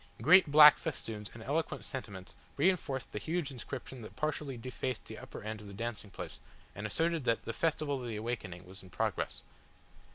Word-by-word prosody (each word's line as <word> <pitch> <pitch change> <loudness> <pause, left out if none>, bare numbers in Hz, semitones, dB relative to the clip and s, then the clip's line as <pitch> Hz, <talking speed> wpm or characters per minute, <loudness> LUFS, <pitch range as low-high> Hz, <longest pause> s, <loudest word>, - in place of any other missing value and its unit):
Great 165 - +7
black 150 0 +10
festoons 110 -9 -4
and 115 - -9
eloquent 155 +6 -1
sentiments 100 -9 -7 0.2
reinforced 145 -5 +1
the 105 - -3
huge 160 +2 -2
inscription 130 0 -7
that 105 -2 -10
partially 145 -1 -2
defaced 130 +1 -4
the - - -8
upper - - -9
end 110 0 -5
of 105 - -10
the 100 - -9
dancing 115 -1 -4
place, - - -8 0.3
and 105 +3 -4
asserted 165 +4 0
that 115 -2 +1
"The 115 - -3
Festival 150 -3 0
of 125 - -5
the 115 - -3
Awakening" 105 -6 -4
was 95 +2 -11
in 95 - -14
progress. - - -2
125 Hz, 185 wpm, -33 LUFS, 105-150 Hz, 0.3 s, black